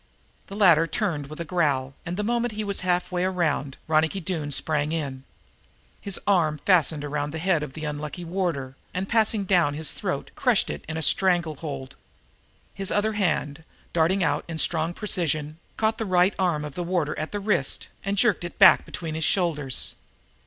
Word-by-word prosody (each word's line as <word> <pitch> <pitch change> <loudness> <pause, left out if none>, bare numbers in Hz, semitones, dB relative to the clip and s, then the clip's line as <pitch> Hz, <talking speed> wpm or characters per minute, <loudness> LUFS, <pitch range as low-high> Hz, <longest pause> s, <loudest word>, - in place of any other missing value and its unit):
The 195 - -8
latter 170 -6 +5
turned 160 -6 -1
with 155 +2 -10
a 170 - -3
growl, 145 -6 0
and 175 +1 -3
the 210 - -1
moment 240 +1 0
he 215 +1 -3
was 200 -1 -2
halfway 180 0 0
around 160 -7 -1
Ronicky 160 +4 +2
Doone 165 -4 -3
sprang 150 +1 0
in. 135 -5 -4 0.8
His 200 -2 -1
right 200 - +4
arm 155 -3 0
fastened 160 -4 +2
around 145 0 -2
the 160 - -5
head 170 -1 +1
of 150 -3 -6
the 155 +1 -6
unlucky 150 +3 -5
warder 165 -7 -2 0.2
and, 185 +1 -2
passing 220 -2 +2
down 175 -6 +3
to - - -6
his 155 -1 -1
throat, - - -4
crushed - - +2
it 75 - -7
in 160 - -3
a 160 - -2
strangle 175 -5 +2
hold. 140 -4 -6 0.8
His 195 -1 -2
other 215 +1 +1
hand, 160 -7 -1 0.3
darting 175 +3 +2
out 150 -2 +1
in 165 -1 -5
strong 165 +1 0
precision, 155 -6 -1 0.2
caught 220 0 +1
the 225 - -1
right 185 +1 +3
arm 170 -5 +1
of 150 - -7
the 175 - -3
warder 170 -4 0
at 155 - -4
the 205 - -3
wrist 195 -9 0 0.2
and 200 +1 -2
jerked 210 -4 +3
it 175 - -7
back - - +7
between 165 -2 -5
his 160 +1 -2
shoulders. 150 - +1
165 Hz, 190 wpm, -25 LUFS, 150-190 Hz, 0.8 s, back